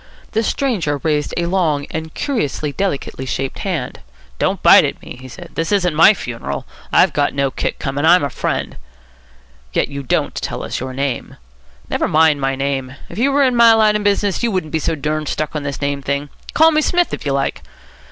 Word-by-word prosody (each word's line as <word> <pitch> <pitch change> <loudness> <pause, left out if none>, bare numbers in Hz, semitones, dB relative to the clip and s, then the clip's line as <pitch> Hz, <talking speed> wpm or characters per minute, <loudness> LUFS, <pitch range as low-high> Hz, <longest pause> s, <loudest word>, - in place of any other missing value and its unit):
The 220 - +1
stranger 215 - 0
raised 150 -2 0
a 170 - 0
long 165 -6 +1
and 160 0 -5
curiously 155 - -2
delicately 140 -6 -3
shaped 135 +1 -3
hand. 170 -10 -3 0.4
"Don't - - 0
bite - - +8
at - - -2
me," - - -10
he 130 - -9
said. 170 +7 -11
"This 165 +3 -2
isn't 180 -5 +2
my 165 +7 +6
funeral. 115 - -5 0.3
I've - - +4 0.2
no 140 -1 +1
kick - - -3
coming. 140 +1 -3
I'm 175 +2 +6
a 140 - -2
friend." - - -3 1.0
"Yet - - +1
you 140 0 -5
don't 130 - 0
tell - - -4
us - - -4
your 130 0 -5
name." 140 -1 -3 0.5
"Never - - 0
mind 155 -2 +3
my 135 0 0
name. 135 -1 -2
If - - -7
you 275 +4 +3
were 280 +1 +3
in 255 -2 +2
my 230 -1 +7
line 215 -1 +4
of 210 - -1
business, 205 -1 +1
you 235 - +1
wouldn't 185 -7 -2
be 160 - +1
so 160 - -1
durned 155 +1 -2
stuck 155 +1 -3
on 150 - -1
this 140 0 -5
name 140 0 -1
thing. 140 +2 -2 0.3
Call 320 +1 +6
me 310 -1 +2
Smith, 350 +3 +1
if - - -4
you 140 - -1
like." 135 0 -1
155 Hz, 205 wpm, -18 LUFS, 140-200 Hz, 1.0 s, bite